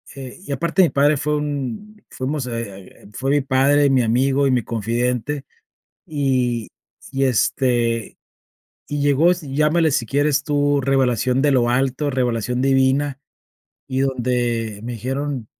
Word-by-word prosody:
eh, 130 -2 -9
y - - -7
aparte 170 +7 +1
mi 170 - +3
padre 145 +2 +3
fue 150 +2 -1
un 145 - -5
fuimos, 135 +1 -3
eh 115 -1 -3
eh 100 -4 -11
eh, - - -14
fue 135 +5 -2
mi 145 0 +3
padre, 140 +2 +3
mi 135 -2 +3
amigo 135 +4 +2
y - - +2
mi 125 -2 +1
confidente, 120 +5 -2 0.6
y 130 -6 0 0.4
y, 135 0 0
este, 120 -1 0 0.7
y 145 -1 -3
llegó, 145 +4 +3
es 180 0 -2
llámale, 150 +3 +1
si 130 -4 0
quieres 145 +2 +1
tú, 145 -1 +1
revelación 130 -1 +1
de 145 0 +3
lo 120 -3 +2
alto, 135 +3 0
revelación 125 -2 -1
divina, 135 +1 +2 0.7
y 130 0 -1
donde 120 -5 -1
me 120 - -4
dijeron 130 +2 -4
135 Hz, 150 wpm, -20 LUFS, 125-145 Hz, 0.7 s, mi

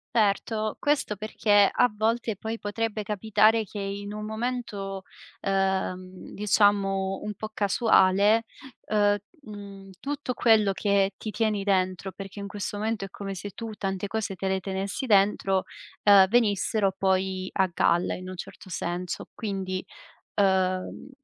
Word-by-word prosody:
Erto, 215 0 +1
questo 290 -7 +1
perché 205 -1 +3
a 245 - +3
volte 225 +1 0
poi 220 +2 -4
potrebbe 215 0 -3
capitare 215 +2 +3
che 210 - -10
in 200 +1 -4
un 210 0 -5
momento, 215 -4 -4 0.4
ehm, 190 -1 -2
diciamo 195 -2 +2
un 210 0 -4
po' 215 +2 -6
casuale, 205 0 +4 0.4
uhm, 205 -1 +3 0.2
mhmm, 200 -4 -10
tutto 280 +2 -3
quello 220 -4 +4
che 200 0 +1
ti 220 - -6
tieni 210 -2 0
dentro, 190 -1 0
perché 195 +2 -9
in 200 - -5
questo 205 +1 -4
momento 215 -1 -2
è - - -10
come 195 +1 -6
se 200 +2 -6
tu 225 +3 -7
tante 195 -1 -3
cose 210 -2 -3
te 190 - -3
le 190 0 +1
tenessi 195 +6 -3
dentro, 195 -3 +3 0.4
ehm, 200 -2 +8
venissero 210 -2 +2
poi 190 -1 0
a 190 -1 +2
galla 170 +1 +2
in 185 - -8
un 185 - -6
certo 185 - -9
senso. 175 +1 -3
Quindi, 190 -4 -3 0.5
uhm 190 +1 +1
200 Hz, 140 wpm, -26 LUFS, 190-215 Hz, 0.5 s, ehm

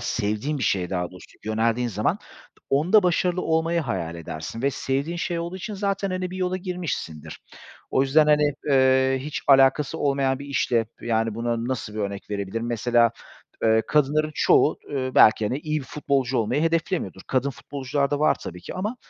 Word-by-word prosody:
sevdiğin 120 +6 -2
bir 130 - -4
şeye 90 -3 0
daha 90 -2 -2
doğrusu 90 - -15
yöneldiğin 115 +3 0
zaman 105 -1 -1 0.5
onda 175 +10 +4
başarılı 180 0 +1
olmayı 165 +1 +1
hayal 85 - -3
edersin 85 - -7
ve 140 - +2
sevdiğin 140 +6 -2
şey 170 0 -2
olduğu 170 +2 -4
için 210 +3 -6
zaten, 195 -1 -1
hani, 185 0 -3
bir 185 - -6
yola 185 0 -1
girmişsindir. 175 - -5 0.5
O 130 - +3
yüzden, 150 +3 +4
hani, 150 -1 +4 0.2
eee, 130 -1 +4
hiç 150 +3 -5
alakası 135 +3 +4
olmayan 135 -2 +1
bir 140 - -8
işle, 120 -5 +1
yani, 115 -2 0
buna 115 0 -2
nasıl 115 -5 -4
bir 110 - -5
örnek 100 0 -4
verebilirim? 105 +3 -3
Mesela, 120 0 +2 0.5
eee, 110 0 +4
kadınların 150 +1 +2
çoğu, 155 - +3
eee, 130 -2 -2
belki, 110 0 +6
hani, 130 +6 -2
iyi 155 0 -2
bir - - -9
futbolcu 135 -2 -1
olmayı 120 +7 0
hedeflemiyordur. 165 - -1
Kadın 135 +1 0
futbolcular 140 +1 -3
da 145 - 0
var 155 - +4
tabii 90 0 -8
ki. - - -8
Ama 210 +7 -3
135 Hz, 175 wpm, -24 LUFS, 115-155 Hz, 0.5 s, belki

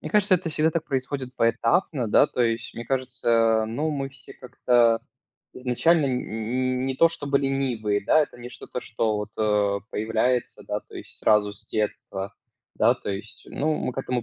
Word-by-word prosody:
Мне - - -6
кажется, 205 -3 +4
это 175 -1 -5
всегда 155 +1 +2
так 165 0 -2
происходит 130 -1 -3
поэтапно, 125 - +1
да, - - +5
то - - -4
есть 115 -1 0
мне 115 - -6
кажется, 115 -4 +1
ну, 145 +8 -2
мы 135 -2 -2
все 135 -1 -14
как-то 120 -2 +2 0.5
изначально 140 +5 +2
н 125 -1 0
н 125 +4 -2
не 135 - -1
то 165 +5 +5
чтобы 140 -3 0
ленивые, 125 -7 0
да, 155 - +5
это 135 - -7
не 120 0 -8
что-то, 125 0 -7
что 110 -1 -1
вот, 105 0 -4
э, 105 -2 +1
появляется, 115 +3 0
да, - - -1
то - - -18
есть - - -10
сразу 105 -1 +3
с 100 - -17
детства. 100 -2 -3 0.4
Да, - - +4
то - - -6
есть, 100 +3 -7
ну, 155 +2 0
мы 125 - -2
к - - -7
этому 125 -2 -2
125 Hz, 185 wpm, -25 LUFS, 110-135 Hz, 0.5 s, да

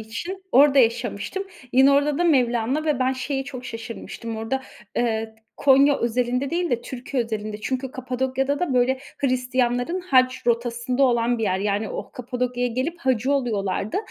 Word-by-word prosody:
için 340 - -6
orada 280 +1 +6
yaşamıştım. 235 - +1 0.3
Yine 265 +2 +6
orada 285 +1 +2
da 350 - +2
Mevlana... 255 -1 +2
ve 300 -4 +1
ben 260 +1 +2
şeye 270 +1 -3
çok 255 -2 -8
şaşırmıştım. 230 -1 -7
Orada, 260 +4 -2 0.3
eee, 225 -2 -1 0.2
Konya 280 +1 +5
özelinde 250 +3 0
değil 345 +1 -1
de 240 - +1
Türkiye 255 0 -3
özelinde. 215 -1 -4
Çünkü 260 +2 -3
Kapadokya'da 260 +2 -1
da 290 -8 0
böyle 255 +1 +3 0.2
Hristiyanların 250 +4 0
haç 255 -8 +2
rotasında 240 +2 0
olan 240 -2 +2
bir - - -3
yer. 190 -3 +1
Yani, 205 +1 -1
o - - -6
Kapadokya'ya 245 0 -2
gelip 260 +9 -2
hacı 260 0 +1
oluyorlardı. 215 -6 -1
250 Hz, 155 wpm, -23 LUFS, 235-270 Hz, 0.3 s, orada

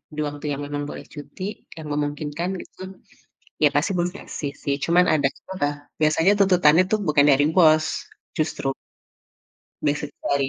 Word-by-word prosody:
di - - -5
waktu 145 +1 -7
yang 140 - -5
memang 145 0 -4
boleh - - -7
cuti 145 +4 -9 0.3
yang 155 -1 -7
memungkinkan 150 +3 -2
gitu, - - -15 0.8
ya, - - +8
pasti - - +2
bos 175 0 +1
ngasih, 145 -7 -5
sih. 140 - 0
Cuman 175 +2 +4
ada 145 -3 +2
aja - - -23 0.2
lah, 145 0 +1 0.3
biasanya 160 +5 +4
tuntutannya, 180 -4 +5
tuh, 215 - +2
bukan 145 -1 +4
dari 140 +1 +4
bos, 155 -3 +6 0.5
justru 155 -3 -1 1.2
biasanya 150 0 -1
dari 140 -1 +1
150 Hz, 155 wpm, -23 LUFS, 145-170 Hz, 1.2 s, ya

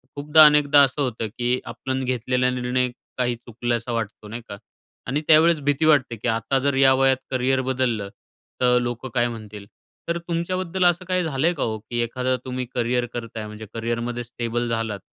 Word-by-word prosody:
खूपदा, 150 +2 +6
अनेकदा 150 -1 +6
असं 140 +2 0
होतं 120 -4 -2
की 125 +1 0
आपण 130 0 -3
घेतलेला 125 0 0
निर्णय 125 0 0 0.3
काही 125 -1 0
चुकल्यासारखा 120 0 -3
वाटतो, 110 -1 -5
नाही 115 +3 -7
का? 100 - -7 0.5
आणि 140 +5 -1
त्यावेळेस 160 +1 +6
भीती 145 +2 +1
वाटते, 140 -6 +3
की 110 - -5
आता 115 +4 +1
जर 140 +1 0
या 135 0 +5
वयात 135 0 +3
करियर 130 +1 +1
बदललं 125 -6 -1 0.5
तर 125 0 +4
लोकं 120 +2 -4
काय 120 -1 +2
म्हणतील? 105 -3 -8 0.4
तर 170 - 0
तुमच्याबद्दल 175 +2 -2
असं 175 +1 +2
काही 185 0 0
झालंय 160 +2 +1
का 150 - -3
ओ, 110 -1 -2
की 120 +3 -5
एखादा 130 +2 -1
तुम्ही 130 0 -3
करियर 120 0 0
करताय, 115 -2 -6
म्हणजे 105 +1 -9
करियरमध्ये 120 +1 -3
स्टेबल 120 0 -3
झालात, 115 -3 -2
125 Hz, 175 wpm, -23 LUFS, 120-140 Hz, 0.5 s, खूपदा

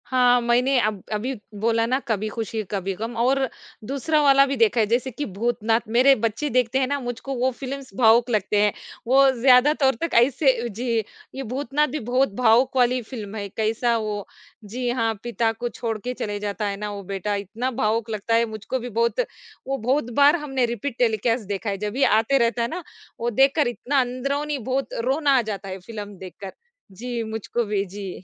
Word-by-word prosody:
हाँ, 250 -1 +4
मैंने 250 +3 +2
अब 210 -4 -1
अभी 235 +6 -2 0.3
बोला 225 +1 +2
ना 255 +3 +1
कभी 215 -2 -1
खुशी 220 0 -4
कभी 195 -1 -2
ग़म, 225 +4 -5
और 265 +2 +2 0.4
दूसरा 280 +5 0
वाला 275 -1 +6
भी 275 0 -2
देखा 230 0 +3
है 220 - +4
जैसे 240 +4 0
कि 290 +5 -4
भूतनाथ, 225 +2 0
मेरे 250 +5 +5
बच्चे 230 +6 -2
देखते 250 0 +1
हैं 260 - +1
ना, 285 +1 -1
मुझको 245 +2 -5
वो 255 +1 +1
फ़िल्म्स 270 +1 -7
भावुक 235 0 +5
लगते 210 -2 +1
हैं। 210 -1 +3 0.3
वो 270 +2 +6
ज़्यादातर 265 +1 +5
तक 335 - -2
ऐसे 255 0 +3
जी, 235 +2 -2 0.4
ये 270 - -4
भूतनाथ 275 +4 0
भी 305 +3 -4
बहुत 250 -1 +1
भावुक 250 +2 +3
वाली 250 0 +3
फ़िल्म 220 -3 -8
है, 200 -2 -4
कैसा 225 +3 0
वो 210 -2 -3 0.4
जी 245 +4 -3
हाँ, 230 -2 0
पिता 235 -1 0
को 240 +2 -4
छोड़ 225 -2 -4
के 245 +4 -5
चले 205 -4 -4
जाता 210 +1 -3
है 200 0 -3
ना 210 +1 -4
वो 200 -1 -7
बेटा, 195 +2 -3
इतना 210 +6 -3
भावुक 225 -2 0
लगता 220 +1 -1
है 230 0 +3
मुझको 220 +3 -4
भी 245 +1 -6
बहुत 235 - 0 0.5
वो 270 0 -1
बहुत 250 +1 0
बार 285 +5 +6
हमने 270 -6 -1
रिपीट 235 +2 -4
टेलीकास्ट 230 -1 +1
देखा 205 +1 -3
है, 200 - -2
जब 210 +1 -4
भी 270 +3 +1
आते 225 +6 +3
रहता 235 -1 +1
है 235 - +1
ना, 345 +8 -6 0.4
वो 235 - 0
देखकर 270 +5 +3
इतना 260 +3 0
अंदरूनी 275 +4 -2
बहुत 260 +2 -3
रोना 280 +3 +2
आ - - +4
जाता 200 -3 -5
है 190 0 -6
फ़िल्म 205 0 -8
देखकर। 190 +1 -9 0.4
जी, 235 +4 -4
मुझको 220 +2 -3
भी 205 -1 -1
जी। 195 +1 -7
235 Hz, 200 wpm, -23 LUFS, 215-260 Hz, 0.5 s, वाला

